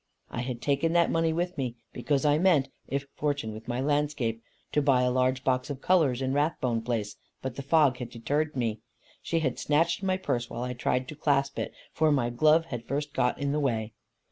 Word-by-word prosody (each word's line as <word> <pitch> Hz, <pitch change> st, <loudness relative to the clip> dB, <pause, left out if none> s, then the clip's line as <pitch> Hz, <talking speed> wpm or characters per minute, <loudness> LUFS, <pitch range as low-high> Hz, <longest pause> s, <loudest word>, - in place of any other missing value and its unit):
I 120 Hz, -, -3 dB
had 125 Hz, -1 st, -5 dB
taken 145 Hz, +3 st, +1 dB
that 170 Hz, -1 st, +4 dB
money 165 Hz, 0 st, +2 dB
with 175 Hz, 0 st, -2 dB
me, 125 Hz, -3 st, -2 dB, 0.2 s
because 140 Hz, +3 st, 0 dB
I 150 Hz, +1 st, +4 dB
meant, 165 Hz, -7 st, +3 dB, 0.2 s
if 140 Hz, 0 st, -2 dB
fortunate 145 Hz, -7 st, -2 dB
with 110 Hz, +1 st, -10 dB
my 120 Hz, 0 st, -2 dB
landscape, 145 Hz, -5 st, 0 dB, 0.3 s
to 150 Hz, -, +2 dB
buy 135 Hz, -3 st, +3 dB
a 125 Hz, -, +2 dB
large 130 Hz, 0 st, +1 dB
box 130 Hz, 0 st, 0 dB
of 140 Hz, -2 st, -4 dB
colours 140 Hz, -7 st, +2 dB
in 130 Hz, 0 st, 0 dB
Rathbone 135 Hz, -5 st, 0 dB
place; 110 Hz, -3 st, -3 dB, 0.3 s
but 130 Hz, -2 st, -4 dB
the 140 Hz, -, -4 dB
fog 140 Hz, -2 st, +3 dB
had 125 Hz, -2 st, -5 dB
deterred 145 Hz, +6 st, -1 dB
me. 115 Hz, -4 st, -1 dB, 0.4 s
She 165 Hz, -1 st, -1 dB
had 130 Hz, -5 st, -1 dB
snatched 165 Hz, +5 st, +2 dB
my 190 Hz, -1 st, +1 dB
purse 125 Hz, -10 st, -2 dB
while 120 Hz, -, -4 dB
I 125 Hz, 0 st, -3 dB
tried 125 Hz, +1 st, -1 dB
to 150 Hz, -, -7 dB
clasp 140 Hz, -2 st, +1 dB
it, -, -, -3 dB, 0.2 s
for 155 Hz, 0 st, +3 dB
my 125 Hz, -4 st, +1 dB
glove 155 Hz, +6 st, +4 dB
had 120 Hz, -6 st, -6 dB
first 145 Hz, +2 st, -2 dB
got 125 Hz, -, +1 dB
in 140 Hz, -1 st, -1 dB
the 150 Hz, -, 0 dB
way. 115 Hz, -6 st, -1 dB
140 Hz, 215 wpm, -28 LUFS, 125-150 Hz, 0.4 s, that